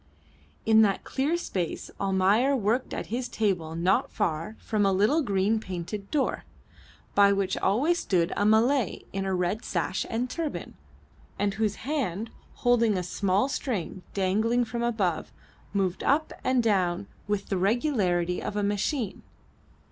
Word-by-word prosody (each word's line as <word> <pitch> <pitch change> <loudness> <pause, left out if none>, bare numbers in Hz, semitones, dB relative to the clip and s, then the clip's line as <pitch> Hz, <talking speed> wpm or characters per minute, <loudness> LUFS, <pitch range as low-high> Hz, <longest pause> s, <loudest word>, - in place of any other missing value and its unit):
In 220 0 +6
that 200 -3 +2
clear 290 +6 0
space 180 - -3
Almayer 200 +8 +3
worked 235 +2 0
at - - -5
his 250 +1 -1
table 180 -7 -1
not 180 +3 +2
far 165 +6 -2
from 215 -2 -1
a 195 - +4
little 210 +12 +3
green 200 -2 +1
painted 190 +1 -6
door, 290 -3 0 0.7
by 200 0 +6
which 195 -1 0
always 290 - +2
stood 170 -3 +1
a - - +1
Malay 225 +3 +3
in 195 0 -2
a 190 -1 0
red 180 +5 -1
sash 185 +1 -1
and 235 +3 -1
turban, 315 +3 -4 0.6
and 205 -1 0
whose 210 0 0
hand, 230 - -2 0.2
holding 230 -4 +3
a 180 - -1
small 195 +5 +1
string 205 - -3
dangling 215 +5 +2
from 235 +1 -4
above, 215 -8 0 0.4
moved 190 -3 0
up 305 +3 +2
and 255 -2 +2
down 190 -3 +1 0.2
with 205 -1 -2
the 195 - 0
regularity 190 - +1
of - - -4
a 205 - 0
machine. 205 +3 -1
205 Hz, 150 wpm, -27 LUFS, 190-240 Hz, 0.7 s, In